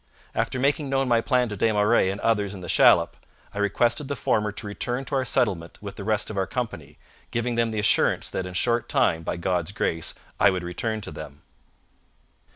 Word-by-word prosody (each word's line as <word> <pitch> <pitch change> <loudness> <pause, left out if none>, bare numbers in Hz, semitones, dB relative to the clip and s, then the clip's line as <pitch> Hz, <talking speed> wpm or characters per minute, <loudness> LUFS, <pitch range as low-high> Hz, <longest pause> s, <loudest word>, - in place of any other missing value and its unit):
After - - -1
making 140 +2 +1
known 135 0 +1
my 120 -2 +3
plan 125 +1 +2
to 105 - -4
Des 110 +3 +2
Marais 105 -1 +3
and 100 +1 -3
others 105 -3 +1
in 95 - -9
the - - -7
shallop, - - +5 0.4
I 100 - -5
requested 120 +6 +1
the 140 - -2
former 105 -4 0
to 105 - -7
return 120 +5 -3
to 135 - -7
our 135 -1 +1
settlement 100 -9 0
with 100 -1 -8
the 100 - -7
rest 110 0 0
of 105 - -6
our 95 -1 0
company, 110 - -5 0.3
giving 120 +1 -1
them 115 0 +1
the 110 - -4
assurance 105 - +2
that 90 - -3
in - - -7
a - - -9
short 120 +4 +1
time, 80 - +2
by 80 - -3
God's 90 0 -1
grace, 80 -4 -1 0.2
I - - +6
would 95 -2 -2
return 110 +5 -3
to - - -6
them.' 75 -1 -10
105 Hz, 215 wpm, -25 LUFS, 95-120 Hz, 0.4 s, I